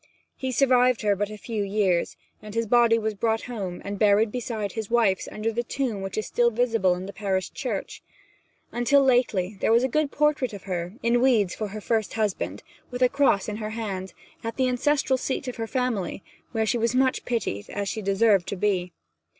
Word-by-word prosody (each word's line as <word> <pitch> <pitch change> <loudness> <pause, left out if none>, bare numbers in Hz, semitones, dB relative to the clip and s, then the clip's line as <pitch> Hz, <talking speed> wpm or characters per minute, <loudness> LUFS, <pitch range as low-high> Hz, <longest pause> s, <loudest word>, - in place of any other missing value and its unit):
He 260 -1 -3
survived 250 -2 +3
her 205 -1 +3
but 205 +1 -2
a 215 - -8
few 220 0 -4
years, 195 -3 0 0.2
and 210 0 -10
his 230 0 +1
body 235 0 +4
was 220 -1 -1
brought 220 +2 0
home 195 -8 -5
and 200 0 -4
buried 210 +1 +4
beside 225 -4 -3
his 220 -3 -5
wife's 225 -5 +2
under 215 +2 -2
the 235 +2 -1
tomb 240 -4 -3
which 195 +1 -5
is 215 - -1
still 240 0 +2
visible 225 -6 +2
in 180 +1 -6
the 200 - -8
parish 190 -2 -2
church. 245 -9 -4 0.7
Until 260 +4 +3
lately 220 -7 +2
there - - +2
was 235 +2 +5
a - - +3
good 305 +3 0
portrait 295 -4 +1
of 200 - -8
her, 180 -1 -4
in 235 +1 +3
weeds 225 -8 +3
for 215 - -3
her 210 +2 -7
first 220 -1 -1
husband, 215 -4 -2 0.3
with 250 0 -1
a 250 - +5
cross 275 -9 +2
in 210 -1 -3
her 215 -1 -4
hand, 190 -5 -4 0.3
at 230 0 -4
the 260 -1 +2
ancestral 260 +1 +1
seat 265 +1 -3
of 250 - -5
her 225 -1 -3
family, 235 -7 -2 0.3
where 225 -2 0
she 235 +2 0
was 230 +2 +1
much 260 0 +2
pitied, 205 - -3
as 200 -1 -3
she 220 - -3
deserved 200 -1 +3
to - - -3
be. 180 -3 0
220 Hz, 205 wpm, -25 LUFS, 200-245 Hz, 0.7 s, was